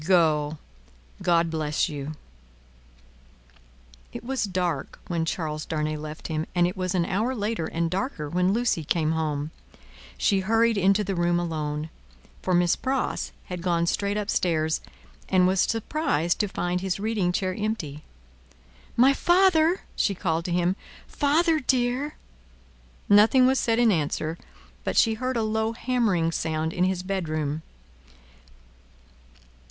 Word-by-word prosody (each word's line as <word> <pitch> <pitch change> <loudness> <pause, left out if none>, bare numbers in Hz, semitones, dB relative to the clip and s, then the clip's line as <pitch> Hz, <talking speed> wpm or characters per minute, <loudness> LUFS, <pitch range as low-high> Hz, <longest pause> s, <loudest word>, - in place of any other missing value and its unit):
Go! 155 -4 +2 0.6
God 170 -2 +2
bless 155 -2 0
you!" 145 0 -5 2.0
It - - -8
was 260 -2 -1
dark 180 -6 -2
when 170 -2 -1
Charles 155 -3 -3
Darnay 155 -1 -2
left 155 0 -7
him, 155 0 -2
and 175 -1 +4
it 180 +3 -2
was 185 -1 -2
an 175 -2 +2
hour 220 +8 0
later 210 -5 -2
and 165 +1 -1
darker 185 - -2
when 180 +4 +1
Lucie 225 -7 +1
came 155 +1 +1
home; 155 -2 -2 0.7
she 200 -3 +2
hurried 225 +4 +2
into 195 +1 +3
the 195 0 -2
room 175 -1 +1
alone 155 -2 -3 0.5
for 185 - +1
Miss 175 0 +3
Pross 265 0 -2
had 180 -1 -6
gone 170 -1 +1
straight 200 +4 0
up 210 0 -2
stairs 160 -3 +1 0.5
and 185 -1 +4
was 185 0 +3
surprised 225 - 0
to 210 - +2
find 180 -1 -2
his 190 0 -2
reading 205 -4 0
chair 185 0 -1
empty. 185 -9 -3 1.0
"My 260 +4 +6
father!" 350 +1 +4
she 200 - +1
called 165 -3 -1
to 180 - -3
him. 175 +1 +1 0.3
"Father 315 +3 +2
dear!" 255 +2 0 0.9
Nothing 220 +6 +6
was 265 +1 +3
said 230 -1 +1
in 235 -2 +5
answer, 160 -1 -1 0.4
but - - -2
she 225 - +5
heard 255 +3 -2
a 225 - +1
low 220 +1 0
hammering 225 -10 +1
sound 160 0 -2
in 180 - +2
his 185 -1 -1
bedroom. 155 -6 -2
180 Hz, 140 wpm, -26 LUFS, 160-220 Hz, 2.0 s, My